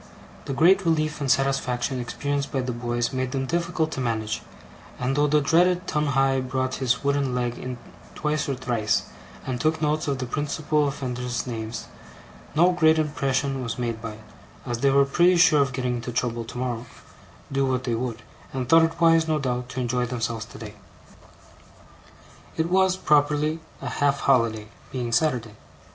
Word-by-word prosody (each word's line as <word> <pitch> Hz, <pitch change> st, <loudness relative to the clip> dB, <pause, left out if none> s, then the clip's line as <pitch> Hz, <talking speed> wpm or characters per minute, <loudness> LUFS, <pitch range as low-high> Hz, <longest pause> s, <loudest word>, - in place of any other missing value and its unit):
The -, -, -3 dB
great 185 Hz, +7 st, +5 dB
relief 155 Hz, -3 st, 0 dB
and 140 Hz, -, -1 dB
satisfaction 130 Hz, -1 st, +1 dB
experienced 140 Hz, +3 st, -2 dB
by 135 Hz, -, 0 dB
the 125 Hz, 0 st, -3 dB
boys 120 Hz, +1 st, -2 dB
made 130 Hz, -1 st, -2 dB
them 135 Hz, -1 st, -1 dB
difficult 170 Hz, 0 st, -1 dB
to 135 Hz, -, -4 dB
manage; 110 Hz, -3 st, -2 dB, 0.6 s
and 125 Hz, +2 st, -1 dB
though 145 Hz, +1 st, +3 dB
the 150 Hz, +1 st, +3 dB
dreaded 175 Hz, +5 st, +3 dB
Tungay 135 Hz, -3 st, +1 dB
brought 130 Hz, 0 st, -2 dB
his 125 Hz, 0 st, +1 dB
wooden 140 Hz, -2 st, +1 dB
leg 120 Hz, -1 st, -1 dB
in 125 Hz, -1 st, -5 dB, 0.4 s
twice 150 Hz, -1 st, -1 dB
or 135 Hz, -, 0 dB
thrice, 120 Hz, -4 st, 0 dB, 0.4 s
and 125 Hz, -2 st, -3 dB
took 160 Hz, +1 st, +1 dB
notes 155 Hz, 0 st, 0 dB
of 140 Hz, -2 st, 0 dB
the 130 Hz, -, -3 dB
principal 150 Hz, +2 st, 0 dB
offenders' 125 Hz, -3 st, -3 dB
names, 115 Hz, -2 st, -5 dB, 0.7 s
no 175 Hz, +4 st, +5 dB
great 160 Hz, -3 st, +4 dB
impression 140 Hz, -3 st, 0 dB
was 115 Hz, -2 st, -4 dB
made 115 Hz, -2 st, -3 dB
by 115 Hz, -2 st, -5 dB
it, 110 Hz, +1 st, -14 dB, 0.4 s
as 120 Hz, -1 st, -3 dB
they 140 Hz, -, +3 dB
were 140 Hz, 0 st, +5 dB
pretty 175 Hz, +6 st, +4 dB
sure 155 Hz, -4 st, +6 dB
of 140 Hz, -1 st, +1 dB
getting 125 Hz, -1 st, -1 dB
into 120 Hz, +1 st, -5 dB
trouble 120 Hz, -1 st, -1 dB
tomorrow, 120 Hz, 0 st, -4 dB, 0.6 s
do 135 Hz, 0 st, +1 dB
what 130 Hz, -1 st, 0 dB
they 120 Hz, -2 st, -1 dB
would, 115 Hz, 0 st, -3 dB, 0.3 s
and 130 Hz, -2 st, -3 dB
thought 165 Hz, +4 st, +7 dB
it 165 Hz, +1 st, -5 dB
wise, 165 Hz, -1 st, +5 dB
no 155 Hz, -1 st, +1 dB
doubt, 125 Hz, -3 st, -2 dB
to 130 Hz, -, -5 dB
enjoy 125 Hz, 0 st, 0 dB
themselves 115 Hz, -2 st, -3 dB
today. 105 Hz, -1 st, -10 dB, 1.8 s
It 165 Hz, +2 st, 0 dB
was, 190 Hz, 0 st, +3 dB
properly, 150 Hz, 0 st, +2 dB, 0.2 s
a -, -, -3 dB
half 140 Hz, -1 st, +1 dB
holiday; 115 Hz, -5 st, +2 dB, 0.2 s
being 125 Hz, -3 st, -3 dB
Saturday. 115 Hz, -4 st, +1 dB
135 Hz, 170 wpm, -25 LUFS, 125-150 Hz, 1.8 s, thought